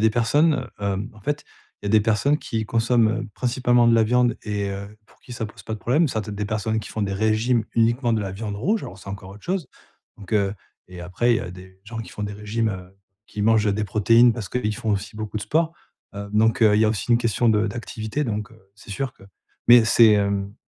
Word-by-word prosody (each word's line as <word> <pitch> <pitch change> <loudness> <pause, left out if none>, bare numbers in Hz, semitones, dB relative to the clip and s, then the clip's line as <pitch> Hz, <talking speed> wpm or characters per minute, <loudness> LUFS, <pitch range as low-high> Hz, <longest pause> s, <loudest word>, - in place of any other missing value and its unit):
a - - -2
des 110 - +5
personnes, 135 +5 +2
heu, - - -4
hem, 100 +1 -2
en 110 - -16
fait, 145 +7 -3 0.4
il 105 - -5
y - - 0
a - - 0
des 110 - +5
personnes 115 +7 +2
qui 110 -6 -3
consomment, 115 +1 +2
heu, 115 - -8
principalement 120 -1 +2
de 115 - +5
la 115 - +5
viande 120 +1 +2
et 100 -2 -2
heu, 100 +2 -7
pour - - -26
qui 125 - -12
ça 115 -2 -4
pose 105 - -14
pas 110 - -5
de - - -8
problème, 145 +8 +2
ça 110 - -2
peut 105 0 -7
être - - -5
des 105 - -3
personnes 110 +1 -1
qui - - -9
font 110 - -3
des 100 -1 -1
régimes 110 +3 +1
uniquement 115 +1 +2
de 110 - +1
la 100 -2 -4
viande 100 +1 -5
rouge 205 - 0
alors 95 - -8
c'est 100 - -12
encore 95 -1 -7
autre 100 +1 -13
chose. 180 -6 -2 0.5
Donc, 100 -2 -11
heu 100 -1 +1 0.3
et 90 -1 -10
après, 115 +7 +1
il - - +2
y - - -2
a 90 - -6
des 95 +1 -13
gens 115 +1 -7
qui 115 - -9
font 105 - -7
des 105 - -3
régimes, 105 +2 -2
heu, 95 -1 -8 0.3
qui 105 - -5
mangent 110 -2 +3
des 105 +1 -1
protéines 115 +4 +4
parce 110 -5 -6
qu'ils 110 -3 -2
font 110 - -3
aussi 100 +2 -2
beaucoup 110 0 -5
de 105 - -3
sport, 165 +1 0 0.4
heu. 100 0 -6
Donc, 110 +3 +2
heu, 105 -1 +6
il 105 - +3
y - - +5
a - - +4
aussi 110 +2 -3
une 115 - +5
question 115 0 +1
de 110 0 +3
d'activité, 115 +4 -4
donc, 105 0 -3
heu, 110 -4 -21
c'est 105 - -14
sûr 130 +6 -3
que - - -22 0.5
mais 120 -1 +8
c'est, 115 -1 +6
hem. 100 0 0
110 Hz, 265 wpm, -23 LUFS, 100-120 Hz, 0.5 s, mais